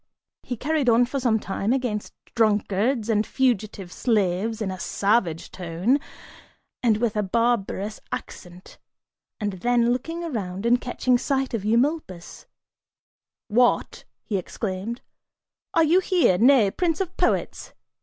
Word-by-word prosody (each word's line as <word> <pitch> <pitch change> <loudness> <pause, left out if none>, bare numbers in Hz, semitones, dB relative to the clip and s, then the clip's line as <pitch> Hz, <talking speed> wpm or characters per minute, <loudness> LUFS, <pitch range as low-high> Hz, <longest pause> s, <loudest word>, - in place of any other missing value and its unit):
He 245 - -5
carried 290 0 +1
on 235 +1 +5
for 275 +3 -3
some 235 -4 +2
time 195 +2 -2
against 245 -5 -2 0.2
drunkards 215 +1 +1
and 215 -2 +2
fugitive 215 -8 -1
slaves, 215 -1 0
in 205 -4 -2
a 185 - -7
savage 195 -7 0
tone 180 - 0 0.8
and 225 -4 +3
with 225 -1 -1
a 210 - +1
barbarous 215 -1 -1
accent, 180 +1 -8 0.6
and 205 -2 -2
then, 240 0 +3
looking 330 +7 -4
around 200 - -4
and 245 +1 +3
catching 250 0 +1
sight 270 -1 -1
of 225 -4 -2
Eumolpus, 230 - -1 1.0
"What," 240 +3 +1 0.2
he 205 - -2
exclaimed, 195 +4 -4 0.7
"are 330 - +5
you 330 +4 +4
here, 355 - +2
nay 235 -5 +5
prince 330 - -1
of 370 -1 -3
poets? - - -1
230 Hz, 130 wpm, -24 LUFS, 200-255 Hz, 1.0 s, on